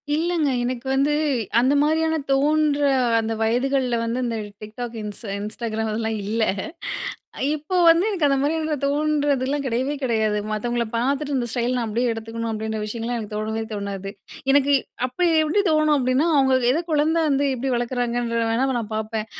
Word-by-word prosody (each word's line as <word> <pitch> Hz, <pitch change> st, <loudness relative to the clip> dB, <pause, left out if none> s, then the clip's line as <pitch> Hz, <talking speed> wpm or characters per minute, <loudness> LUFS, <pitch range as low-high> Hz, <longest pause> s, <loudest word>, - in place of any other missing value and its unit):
இல்லங்க. 325 Hz, -2 st, +1 dB
எனக்கு 250 Hz, +1 st, -3 dB
வந்து 280 Hz, +2 st, +2 dB, 0.5 s
அந்த 260 Hz, +3 st, +3 dB
மாதிரியான 320 Hz, +2 st, +2 dB, 0.2 s
தோன்ற 295 Hz, +1 st, +2 dB, 0.4 s
அந்த 225 Hz, 0 st, -2 dB
வயதுகள்ல 250 Hz, +2 st, +1 dB
வந்து, 230 Hz, +2 st, -2 dB
இந்த 230 Hz, -1 st, -2 dB, 0.2 s
டிக்டாக் 230 Hz, +3 st, -7 dB
இன்ஸ் 210 Hz, +2 st, -7 dB, 0.2 s
இன்ஸ்டாகிராம் 220 Hz, +1 st, -3 dB
அதெல்லாம் 220 Hz, 0 st, -2 dB
இல்ல. 220 Hz, +2 st, 0 dB, 1.1 s
இப்போது 345 Hz, +4 st, +1 dB
வந்து 330 Hz, +2 st, +5 dB
எனக்கு 370 Hz, -8 st, 0 dB
அந்த 275 Hz, -1 st, +2 dB
மாதிரியான 310 Hz, +1 st, 0 dB
தோன்றதுலாம் 285 Hz, -1 st, +1 dB
கிடையவே 260 Hz, +3 st, 0 dB
கிடையாது. 220 Hz, -4 st, +1 dB
மத்தவங்கள 235 Hz, +2 st, -1 dB
பார்த்துட்டு, 275 Hz, +4 st, 0 dB
இந்த 240 Hz, -2 st, -1 dB
ஸ்டைல் 240 Hz, +1 st, 0 dB
நான் 240 Hz, -, -1 dB
அப்பிடியே 235 Hz, +3 st, 0 dB
எடுத்துக்கணும் 225 Hz, 0 st, -4 dB
அப்பிடின்ற 220 Hz, 0 st, -3 dB
விஷயங்கள்லாம் 230 Hz, +3 st, -3 dB
எனக்கு 210 Hz, -1 st, -7 dB
தோணவே 220 Hz, +1 st, -2 dB
தோணாது. 200 Hz, -2 st, -4 dB, 0.4 s
எனக்கு 285 Hz, 0 st, +4 dB, 0.3 s
அப்ப 255 Hz, 0 st, -8 dB, 0.2 s
எப்பிடி 315 Hz, +6 st, +2 dB
தோணும் 310 Hz, -1 st, +3 dB
அப்பிடின்னா, 260 Hz, +3 st, +2 dB
அவுங்க 265 Hz, -1 st, +4 dB, 0.2 s
எத 295 Hz, -, +1 dB
குழந்த 310 Hz, +2 st, +2 dB
வந்து 280 Hz, 0 st, +2 dB
எப்பிடி 260 Hz, +1 st, -2 dB
வளர்க்குறாங்கன்ற 240 Hz, -1 st, -1 dB
வேணா 250 Hz, +4 st, +1 dB
நான் 220 Hz, -2 st, -6 dB
பார்ப்பேன். 220 Hz, 0 st, -3 dB
250 Hz, 150 wpm, -23 LUFS, 225-290 Hz, 1.1 s, வந்து